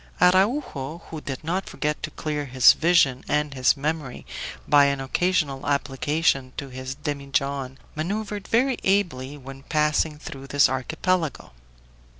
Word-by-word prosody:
Araujo, 180 - +2
who 160 -2 -6
did 135 -1 -6
not 180 +4 -2
forget 150 0 -2
to - - -3
clear 150 -2 -3
his 130 -1 +6
vision 160 -7 +3
and 150 -1 0
his 130 +1 +3
memory 150 -2 -3 0.4
by 145 -1 +6
an 140 -1 +1
occasional 140 -1 0
application 140 -1 0
to 140 - -5
his 130 +1 -6
demijohn, 140 -2 -2 0.2
maneuvered 205 +5 -3
very 255 +2 +2
ably 165 -9 0
when 135 0 -10
passing 150 +1 +1
through 135 -2 -9
this 145 +1 +4
archipelago. 155 - -1
145 Hz, 135 wpm, -24 LUFS, 135-165 Hz, 0.4 s, his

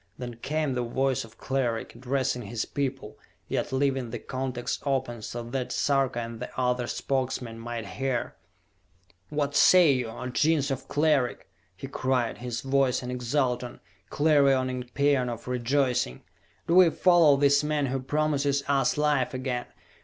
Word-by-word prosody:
Then 120 -2 -7
came 150 +2 -1
the 125 - -1
voice 130 +2 0
of 115 0 -15
Cleric, 125 -4 -2
addressing 130 +1 -1
his 110 +1 -3
people, 135 -6 -4 0.3
yet - - -2
leaving 135 -2 0
the 120 - -4
contacts 130 0 -4
open 130 -4 -1
so 120 +2 -5
that 125 +2 -4
Sarka 135 -3 +1
and 115 0 -7
the 125 - -5
other 125 -1 0
Spokesmen 130 -4 -2
might 115 -1 -5
hear. 135 -3 -2 1.0
"What 145 -1 -1
say 175 +2 +7
you, 125 -3 0
O 120 +3 -7
Gens 145 +2 +1
of 135 0 -4
Cleric?" 145 -4 +1 0.3
he 135 - -7
cried, 130 -3 -1
his 120 -1 -4
voice 135 -2 +1
an 125 - -4
exultant, 125 0 -1 0.3
clarioning 135 -4 +2
paean 140 -3 +2
of 120 0 -7
rejoicing. 125 - 0 0.4
"Do 170 - 0
we 185 -2 +8
follow 170 -4 +5
this 140 +1 +4
man 150 -1 0
who 135 0 -1
promises 140 0 0
us 140 0 +2
life 145 -4 +1
again? 130 -1 -3
130 Hz, 150 wpm, -27 LUFS, 125-140 Hz, 1.0 s, we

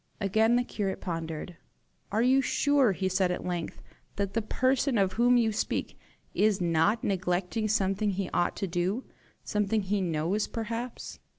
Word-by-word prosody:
Again 220 +3 +3
the 245 - +2
curate 200 -5 -3
pondered. 165 -1 -5 0.5
"Are 220 +3 +2
you 260 +2 +4
sure," 280 -5 +3
he 190 +1 -1
said 185 0 +1
at 180 - -3
length, 175 -2 -4 0.3
"that 200 -1 -2
the 230 - +1
person 255 +3 +1
of 190 -2 +2
whom 245 +3 +4
you 225 -2 +2
speak 210 - -2 0.4
is 210 -2 +2
not 175 +6 +2
neglecting 190 +3 -1
something 205 0 +1
he 195 -1 -2
ought 175 - +1
to 195 - -3
do 185 +8 -1 0.4
something 210 0 0
he 200 +1 0
knows 175 +4 0
perhaps?" 230 +2 -5
200 Hz, 160 wpm, -28 LUFS, 180-225 Hz, 0.5 s, you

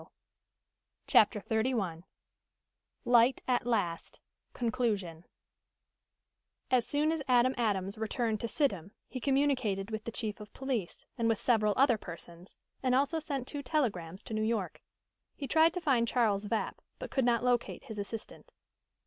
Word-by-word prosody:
"Yes." - - -16 1.0
CHAPTER 210 0 +4
XXXI 220 -7 -1 1.0
LIGHT 240 +1 +4
AT 245 -2 +1
LAST 175 -8 -1 0.3
CONCLUSION 215 -9 -1 1.5
As 250 -2 +3
soon 300 +2 +1
as 325 -2 -1
Adam 250 0 +4
Adams 205 -3 -1
returned 220 0 -1
to 235 - -1
Sidham 200 - -1
he 255 - -6
communicated 255 -7 +1
with 220 0 -4
the 230 - -4
chief 220 -2 -4
of 210 -1 -10
police, 255 -9 -3
and 230 0 +2
with 225 - +2
several 215 -4 +2
other 255 -5 +4
persons, 170 0 -11 0.3
and 255 -1 +2
also 285 +4 +2
sent 280 -5 -4
two 290 0 -5
telegrams 200 - -2
to - - -7
New 215 - 0
York. 220 -3 -1 0.5
He 280 - -5
tried 320 +5 +5
to - - 0
find 250 -7 +2
Charles 215 -5 +1
Vapp, 215 +2 -2 0.2
but - - -7
could 265 - +1
not 240 0 +2
locate 245 -1 0
his 220 -5 -7
assistant. 225 - -7
230 Hz, 150 wpm, -31 LUFS, 205-260 Hz, 1.5 s, tried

